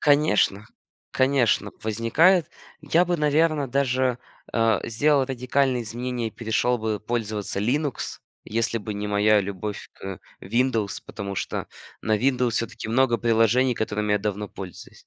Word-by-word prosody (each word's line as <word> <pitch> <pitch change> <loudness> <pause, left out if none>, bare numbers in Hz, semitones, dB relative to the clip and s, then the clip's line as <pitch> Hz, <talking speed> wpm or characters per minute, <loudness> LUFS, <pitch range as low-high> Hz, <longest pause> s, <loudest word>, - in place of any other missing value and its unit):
Конечно, 125 -8 +3 0.4
конечно, 130 -6 +2
возникает 130 - +3 0.3
я 170 +2 +3
бы 175 0 0
наверное 150 -1 +2
даже, 130 -1 +1 0.3
а, 115 -1 +2
сделал 140 +4 +3
радикальные 130 0 0
изменения 120 +1 -3
и - - -13
перешел 120 +2 0
бы 110 -2 -2
пользоваться 110 -3 -3
Linux, 140 +4 -1 0.3
если 115 +1 -1
бы 105 -1 -5
не 105 0 -3
моя 105 +1 +4
любовь 100 +1 -5
к 95 -1 -7 0.2
Windows, 115 -1 0
потому 100 -2 -5
что - - -3 0.4
на 110 0 +2
Windows 125 +1 +1
все-таки 115 -1 -3
много 120 0 +3
приложений 120 +2 +3
которыми 105 -1 -1
я 105 - +3
давно 105 0 -3
пользуюсь. 95 -2 -10
115 Hz, 135 wpm, -24 LUFS, 105-130 Hz, 0.4 s, моя